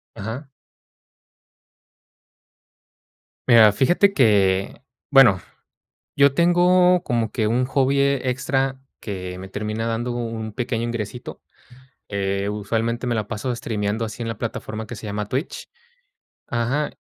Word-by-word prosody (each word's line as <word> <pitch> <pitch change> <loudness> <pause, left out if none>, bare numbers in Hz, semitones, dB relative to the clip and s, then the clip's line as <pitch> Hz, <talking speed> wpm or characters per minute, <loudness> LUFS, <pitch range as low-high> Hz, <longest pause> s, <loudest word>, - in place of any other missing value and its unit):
Ajá. 115 +8 -6 3.0
Mira, 110 -3 +7
fíjate 175 - +3
que 100 - +2 0.3
bueno, 125 -10 +6 0.8
yo 140 -1 +5
tengo 180 +2 +4
como 115 -3 -1
que 110 - -1
un 125 +3 +1
hobby 135 +1 +1
extra 135 0 0 0.2
que 90 -3 -6
me 95 +1 -8
termina 110 +2 -3
dando 115 +2 -2
un 115 -2 -4
pequeño 115 -1 -2
ingresito, 120 0 -5 0.7
eh, 100 0 -1
usualmente, 115 +4 -2
me 120 - 0
la 105 -2 -2
paso 120 +3 -3
streameando 110 -1 -2
así 110 +2 -6
en 115 - -3
la 115 -2 -4
plataforma 110 -1 -5
que 120 - -8
se 105 - -9
llama 105 0 -3
Twitch. 135 +6 -4 0.8
Ajá. 125 +5 -1
115 Hz, 120 wpm, -22 LUFS, 105-135 Hz, 3.0 s, Mira